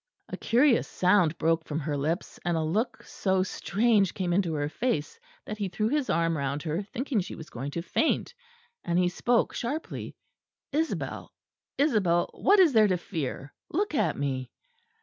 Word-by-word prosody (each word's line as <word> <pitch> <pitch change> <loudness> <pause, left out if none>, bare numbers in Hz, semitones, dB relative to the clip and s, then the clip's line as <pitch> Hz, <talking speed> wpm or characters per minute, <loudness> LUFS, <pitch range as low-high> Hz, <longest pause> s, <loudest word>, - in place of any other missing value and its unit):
A - - -4
curious 245 +2 +3
sound 180 -3 +3
broke 165 0 +1
from 155 0 -3
her 150 0 -2
lips; 155 +6 -2
and 175 -1 0
a 160 - 0
look 220 +8 -1
so 190 -1 0
strange 200 0 +1
came 180 -2 -1
into 175 -4 +1
her 145 -1 -1
face 155 -4 -2 0.3
that 215 0 -6
he 200 -2 -1
threw 215 +5 -1
his 290 0 0
arm 165 0 +2
round 140 0 -2
her, 160 +3 -1
thinking 240 +4 -2
she 180 - -7
was 160 - -11
going 130 +4 -5
to 165 +4 -4
faint: 320 - 0 0.5
and 170 0 0
he 180 0 +3
spoke 235 +6 +1
sharply. 285 +7 -4 0.6
"Isabel, 315 +3 -2 0.5
Isabel, 205 - +2
what 405 +1 +4
is 345 -7 +6
there 215 -2 +6
to 185 -2 +1
fear? 145 -5 -5 0.2
Look 400 +3 -1
at - - +1
me!" 130 -3 -2
180 Hz, 170 wpm, -28 LUFS, 160-235 Hz, 0.6 s, is